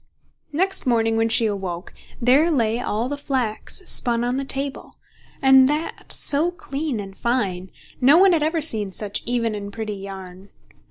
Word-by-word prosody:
Next 375 +1 0
morning 225 -2 +2
when 225 0 +1
she 225 +1 +3
awoke, 190 -4 -4 0.3
there 270 +7 +4
lay 235 -6 +1
all 230 -1 -2
the 285 +1 -4
flax 260 - -2
spun 235 -6 0
on 245 +2 -1
the 275 - -2
table, 275 0 -2 0.5
and 265 0 +7
that 305 +2 -3
so 300 +4 +2
clean 290 -6 -4
and 195 -1 -8
fine, 195 -7 -1 0.3
no 275 +6 +6
one 380 0 +6
had 325 - +2
ever 320 +2 0
seen 215 -10 -1
such 205 +1 -2
even 235 -2 0
and 205 -1 -6
pretty 215 -1 -4
yarn. 195 -1 -9
240 Hz, 165 wpm, -22 LUFS, 210-280 Hz, 0.5 s, and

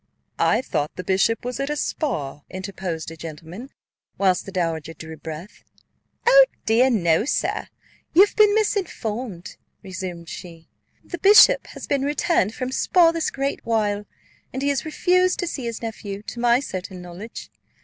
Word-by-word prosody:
"I 230 +4 +3
thought 150 - -2
the 185 - -5
bishop 195 +6 +1
was 250 -1 -4
at 275 +1 -2
Spa," 150 - -2
interposed 185 -4 -5
a - - -8
gentleman, 165 - -9 0.5
whilst 190 -2 +2
the - - -6
dowager 165 -3 -2
drew 160 +1 -9
breath. 160 +5 -9 0.6
"O - - +8 0.2
dear, 235 +4 +4
no, 170 -7 +2
sir; 270 - -1 0.5
you 380 +4 +9
have - - -12
been 420 -1 +5
misinformed," 240 - -2 0.3
resumed 185 -3 -6
she. 165 -1 -10 0.4
"The 350 - -7
bishop 425 +5 +7
has - - -9
been 280 -2 0
returned 290 - +1
from 255 0 -3
Spa 335 +4 +4
this 330 -1 -1
great 275 +1 -3
while, 210 -3 0 0.4
and 265 +1 -4
he 285 - +2
has 280 +1 -1
refused 365 +3 +2
to 350 - -2
see 270 -6 -4
his 235 0 -5
nephew, 210 -3 -6
to 235 - -7
my 240 +1 +4
certain 185 -6 -6
knowledge. 180 +6 -9
220 Hz, 160 wpm, -23 LUFS, 180-280 Hz, 0.6 s, you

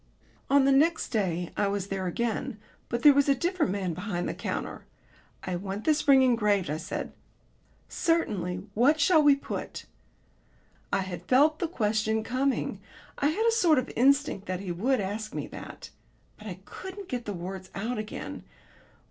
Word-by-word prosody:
On 275 -1 +5
the 275 - +4
next 315 +5 +3
day 180 -6 -1
I 205 - +1
was 200 -1 -2
there 190 -1 -2
again; 225 +3 -2 0.3
but 235 0 -2
there 295 - +9
was 280 0 +3
a 275 - +5
different 345 - 0
man 190 -3 -2
behind 180 0 -3
the - - -2
counter. - - -4 0.6
"I 185 - -3
want 195 +3 -4
this 305 -1 +1
ring 270 -2 +7
engraved," 210 - +2
I 155 - -1
said. 160 - -5 0.7
"Certainly. 195 - -1
What 275 +9 +4
shall 315 +2 +5
we 290 -1 +6
put?" 280 - -6 1.1
I 195 - +2
had 185 -2 -6
felt 300 +4 +4
the 340 - 0
question 220 -5 0
coming. 260 +3 -1 0.4
I 285 - +3
had 390 +10 0
a 460 - +5
sort 355 -9 +4
of 255 - -1
instinct 275 -4 +2
that 185 0 -3
he 190 -3 -4
would 245 +10 +1
ask 210 +2 -4
me - - -3
that. - - -9 0.4
But 215 - -12
I 185 -2 -7
couldn't 380 +1 -8
get 245 -5 -4
the 205 - -3
words 185 +1 -6
out 220 +5 -2
again. 215 0 -6
225 Hz, 175 wpm, -28 LUFS, 195-285 Hz, 1.1 s, there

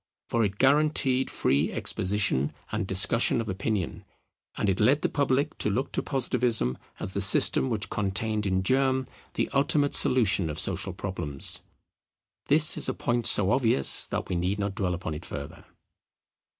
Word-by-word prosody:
For 115 -1 +1
it 100 -1 -2
guaranteed 135 -1 +2
free 70 +2 0
exposition 95 -8 -1 0.2
and 95 - -3
discussion 95 +6 +2
of 115 - -4
opinion: 95 -1 -3 0.5
and - - -1
it 95 -1 0
led 130 +8 +2
the - - +1
public 140 -1 -1
to - - 0
look 130 +7 -2
to - - -2
Positivism 125 - 0 0.2
as 95 - -5
the 100 - -2
system 100 +6 +3
which 110 -3 -3
contained 105 +1 -2
in 95 0 0
germ 130 +4 +1 0.3
the - - -1
ultimate 145 +1 +1
solution 100 -9 +2
of 75 - -6
social 95 - -2
problems. 85 -7 -3 0.9
This 155 +1 +5
is - - 0
a 130 - -3
point 120 -1 -1
so 100 0 +4
obvious 115 - +4
that - - -4
we 90 - -3
need 90 +4 -1
not 100 -1 -3
dwell 95 -4 -2
upon 85 -2 -6
it 75 - -8
further. - - -9
105 Hz, 165 wpm, -26 LUFS, 95-130 Hz, 0.9 s, This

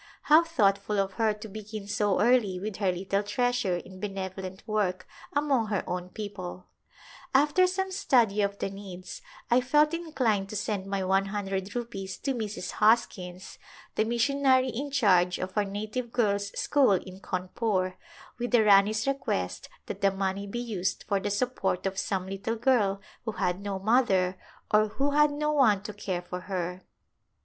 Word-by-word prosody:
How 310 +3 +6
thoughtful 210 -10 +1
of 195 -1 0
her 220 -1 +4
to 210 +1 -7
begin 215 0 -7
so 205 -2 +1
early 215 -5 +3
with 205 0 -5
her 195 -3 +2
little 195 +2 -1
treasure 235 -2 0
in 185 +2 -10
benevo 195 -2 -4
lent 190 +3 -8
work 195 -4 -1 0.3
among 280 -6 +1
her 205 -3 -1
own 180 0 -3
people! 185 -3 -7 0.7
After 300 +7 +5
some 380 +1 -2
study 245 - +3
of 200 0 0
the 195 - -3
needs 190 - -9 0.3
I 245 +2 +5
felt 300 +5 +3
inclined 255 -12 0
to 215 - -6
send 200 -2 -2
my 195 -1 -1
one 190 +1 +2
hundred 195 0 -3
rupees 195 -6 -4
to 275 - 0
Mrs. 215 -6 -4
Hoskins, 190 -5 +1 0.3
the - - +2
missionary 260 +3 +2
in 275 +4 -4
charge 185 -9 +3
of 185 +1 -5
our 210 -1 +2
Native 215 +5 -4
Girls' 200 -4 +1
School 275 -8 +4
in 185 0 -3
Cawnpore, 185 0 -1 0.5
with 245 0 -2
the 240 -3 +5
Rani's 210 +1 +5
request 230 - -2 0.2
that 195 - -6
the 195 - +5
money 195 +1 -2
be 200 - -5
used 210 -6 -2
for 200 -1 +1
the 205 - -2
support 205 -3 -1
of 195 0 -1
some 190 -2 -1
little 195 +4 -3
girl 220 -5 +2 0.2
who 220 -2 -3
had 180 -1 -1
no 200 -1 -3
mother 190 -4 +2 0.3
or 215 0 +5
who 275 +7 -1
had 300 +1 +5
no 300 +1 -1
one 225 -10 +4
to 210 - -6
care 190 -3 -3
for 180 +1 -5
her. 180 -1 -4
205 Hz, 170 wpm, -28 LUFS, 190-240 Hz, 0.7 s, How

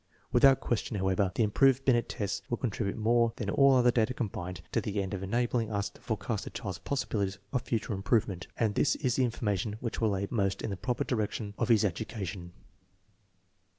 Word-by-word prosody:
Without 135 -1 +6
question, 115 -2 -1
however, 95 0 +1
the 115 - +3
improved 135 +5 +3
Biuct 120 -3 +3
tests 105 -4 -3
will 120 - 0
contribute 105 -4 -2
more 115 +1 +3
than 100 -4 -3
all 140 +3 +5
other 125 -1 +5
data 115 +1 +1
combined 90 -7 -4
to - - +1
the 105 -1 -2
end 95 0 -2
of 95 - -3
enabling 115 +2 0
us 100 -1 -1
to - - -19
forecast 105 -2 -3
a - - -3
child's 95 -4 -5
possibilities 100 -8 -2 0.2
of 125 - +1
future 115 -3 -2
im 95 - -4
provement, 100 -3 0
and 110 -3 +1
this 140 - +2
is 125 -4 0
the 130 - +3
information 105 -4 -1
which 115 -1 -4
will 105 -3 +2
aid 100 +1 -3
most 100 -4 0
in 110 - -2
the - - -2
proper 120 +6 -1
direction 105 -3 -2
of - - 0
his 110 -2 +5
education". 95 -2 -4
110 Hz, 200 wpm, -30 LUFS, 100-120 Hz, 0.2 s, Without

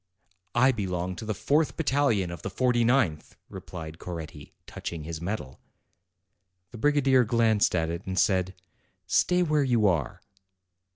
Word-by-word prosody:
"I 130 +3 +5
belong 90 -5 -3
to 110 - -7
the 110 -1 -2
fourth 150 +9 +1
battalion 135 - +1
of 85 - -8
the - - -4
forty 120 +3 +1
ninth," 115 - +1
replied 80 -2 -8
Coretti, 80 -4 -8
touching 85 -3 -6
his 80 0 -6
medal. 85 -8 -5 1.1
The 115 - -10
brigadier 135 -2 +3
glanced 110 -3 +2
at 80 -1 0
it, 85 +3 -6
and 95 0 -3
said, 95 -2 +1 0.5
"Stay 180 0 +2
where 150 -3 +2
you 120 -5 +2
are." 85 -9 0
105 Hz, 140 wpm, -27 LUFS, 85-130 Hz, 1.1 s, I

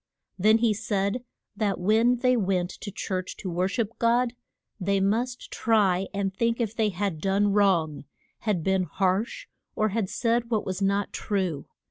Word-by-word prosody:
Then 215 +4 +5
he 225 -1 +2
said 205 +2 -1 0.3
that 205 -3 0
when 220 +6 +3
they 250 +1 +2
went 185 -5 0
to 205 - -8
church 185 -1 -4
to 185 - -5
wor 180 +2 +1
ship 220 +2 -3
God 240 +1 +2 0.5
they 200 +1 +1
must 235 +6 -1
try 195 -4 +2
and 195 -1 -2
think 230 +4 0
if 225 -2 -1
they 220 -2 +2
had 190 -4 -3
done 200 +1 +2
wrong, 170 -8 +2 0.3
had 205 -7 -1
been 190 0 +1
harsh, 200 - -1 0.3
or 215 0 +1
had 205 -2 -1
said 235 0 0
what 220 -3 0
was 185 +1 -3
not 200 +1 0
true. 185 -8 -2
200 Hz, 165 wpm, -26 LUFS, 190-230 Hz, 0.5 s, Then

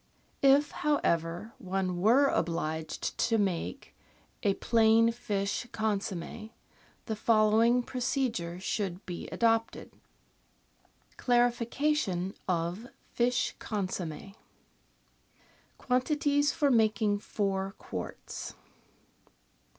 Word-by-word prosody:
If, 280 +2 +5
however, 175 - 0
one 185 -4 -2
were 245 +8 +5
obliged 160 - -2
to 230 -1 +2
make 200 +6 -2 0.5
a 200 -3 +2
plain 230 0 +4
fish 205 -1 -2
con 220 -3 0
somm^, 215 +2 -6 0.6
the 220 - -2
following 225 +3 +4
procedure 240 -9 -2
should 190 -1 -3
be 175 -1 -6
adopted: 225 -1 0 0.7
— - - -36
Clarification 240 - +1
of 180 +5 -1 0.3
Fish 245 +1 +1
Consomme 190 -3 -4 1.4
Quantities 290 +3 +1
for 290 -4 +2
making 215 -3 +2
Four 195 -1 -2
Quarts. - - -7
220 Hz, 85 wpm, -30 LUFS, 190-245 Hz, 1.4 s, If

